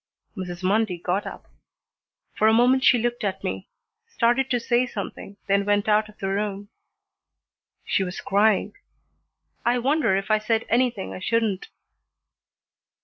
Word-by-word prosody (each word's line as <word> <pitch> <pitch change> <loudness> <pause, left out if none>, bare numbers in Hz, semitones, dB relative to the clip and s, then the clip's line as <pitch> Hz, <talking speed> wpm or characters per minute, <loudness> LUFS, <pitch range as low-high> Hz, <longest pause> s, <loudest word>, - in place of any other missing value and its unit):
Mrs. 180 -2 -6
Mundy 200 -1 +1
got 180 +4 -2
up. - - -9 0.9
For 215 - +2
a 220 - +5
moment 250 +3 +4
she 250 - +6
looked 240 0 -2
at 195 -2 -3
me, 95 0 -4 0.4
started 245 +3 +1
to 245 - +1
say 240 +2 +1
something, 200 -2 -7
then 200 0 +2
went 205 0 +1
out 215 0 +2
of 210 - -17
the 195 - -3
room. 200 0 -3 1.2
She 195 - +1
was 180 0 -5
crying. 205 +1 +2 0.9
I 240 +1 +2
wonder 270 -4 +2
if 195 +2 -2
I 215 - +4
said 220 +1 0
anything 240 -4 0
I - - -7
shouldn't. 215 -1 -1
215 Hz, 145 wpm, -24 LUFS, 195-240 Hz, 1.2 s, she